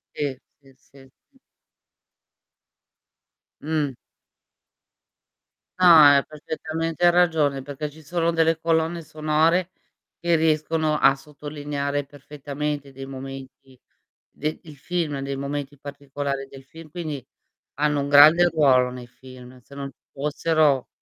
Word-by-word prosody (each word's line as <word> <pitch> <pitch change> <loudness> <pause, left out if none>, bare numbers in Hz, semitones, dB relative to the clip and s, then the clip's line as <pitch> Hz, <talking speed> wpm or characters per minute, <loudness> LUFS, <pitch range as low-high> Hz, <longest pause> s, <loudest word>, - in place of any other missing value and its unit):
Si, 150 - -1 0.3
si, 135 -1 -21
si, 135 +1 -23 0.3
si. - - -28 2.2
Mh. 150 -2 -1 1.9
No, 185 - +5
hai 145 -3 +7
perfettamente 160 +2 -2
ragione, 160 -6 +2
perché 145 +2 -5
ci 155 +2 -16
sono 170 +2 -1
delle 165 0 +2
colonne 165 +1 0
sonore, 155 +4 +1 0.5
che 170 0 +1
riescono 155 -1 +1
a 135 -1 +5
sottolineare 145 0 -5
perfettamente 145 0 -6
dei 135 0 -9
momenti 135 -1 -10 0.5
de 155 +1 -4
il 150 -3 -13
film, 160 -2 -3
dei 140 0 -4
momenti 140 +1 -5
particolari 140 -1 -5
del 135 0 -13
film, 160 +3 -14
quindi 155 -4 -5 0.5
hanno 150 0 0
un 140 - -2
grande 155 +5 +7
ruolo 135 -6 +3
nei 125 -1 -9
film, 130 0 -14
se 140 +3 -17
non 140 0 -5
ci - - -41
fossero 150 -1 +1
145 Hz, 115 wpm, -23 LUFS, 140-160 Hz, 2.2 s, hai